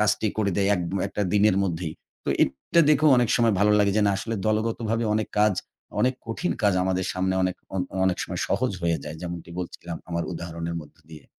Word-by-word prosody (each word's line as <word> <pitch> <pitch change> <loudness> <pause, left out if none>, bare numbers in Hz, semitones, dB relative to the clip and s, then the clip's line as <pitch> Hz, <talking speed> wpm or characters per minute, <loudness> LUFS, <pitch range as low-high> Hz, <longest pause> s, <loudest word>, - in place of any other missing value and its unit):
কাজটি 105 +1 +2
করে 100 -2 +2
দেয় 100 0 +2
এক 90 - -2
ম - - +1
একটা 105 - -2
দিনের 105 -1 +4
মধ্যেই। 85 -3 -3 0.3
তো - - -4
এটা 65 - +2
দেখোও 150 0 +5
অনেক 120 -2 +2
সময় 115 -3 +3
ভালো 105 +1 +5
লাগে 100 -1 +3
যে, 105 - +4
না - - +4
আসলে 115 +3 -3
দলগতভাবে 115 +1 0
অনেক 110 - -1
কাজ 105 -2 +4 0.5
অনেক 130 +1 +3
কঠিন 115 +11 -1
কাজ 100 -2 +4
আমাদের 95 0 0
সামনে 95 0 0
অনেক 90 -1 0 0.2
অ - - -1 0.3
অনেক 90 - +1
সময় - - -4
সহজ 125 +4 +1
হয়ে 85 -1 +2
যায়। 75 +1 -6
যেমনটি 85 -1 -6
বলছিলাম 85 -1 -6
আমার 85 0 -1
উদাহরণের 85 0 -5
মধ্য 75 +1 -17
দিয়ে। 75 -3 -11
100 Hz, 205 wpm, -25 LUFS, 85-110 Hz, 0.5 s, দেখোও